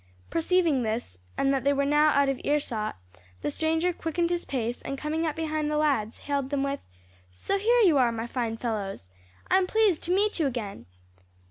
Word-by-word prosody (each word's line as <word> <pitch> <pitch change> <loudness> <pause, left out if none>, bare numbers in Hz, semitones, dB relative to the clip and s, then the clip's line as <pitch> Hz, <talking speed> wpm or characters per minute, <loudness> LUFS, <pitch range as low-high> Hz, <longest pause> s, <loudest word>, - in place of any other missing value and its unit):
Perceiving 330 -4 +2
this, 220 - -3 0.2
and 275 0 +2
that 270 - 0
they 280 +1 +3
were 280 0 +1
now 295 +2 +4
out 280 -1 +3
of 275 -2 -1
earshot, 240 - -1 0.5
the 145 - 0
stranger 320 - +1
quickened 340 +1 -1
his 345 0 -1
pace, 245 -2 -3
and 275 - -5
coming 315 +3 -1
up 305 - -2
behind 310 -2 -1
the 300 - 0
lads, 270 -8 +1
hailed 280 -2 -2
them 280 -1 0
with, 275 0 -2 0.5
"So 90 - -2
here 470 +4 +4
you 335 -10 +5
are, 245 -2 +4
my 225 0 -3
fine 235 -2 -2
fellows! 200 - -4 0.4
I'm 375 0 +4
pleased 425 -5 +2
to 355 +2 +1
meet 410 -1 +1
you 310 - +3
again!" 220 - -5
285 Hz, 195 wpm, -27 LUFS, 240-325 Hz, 0.5 s, you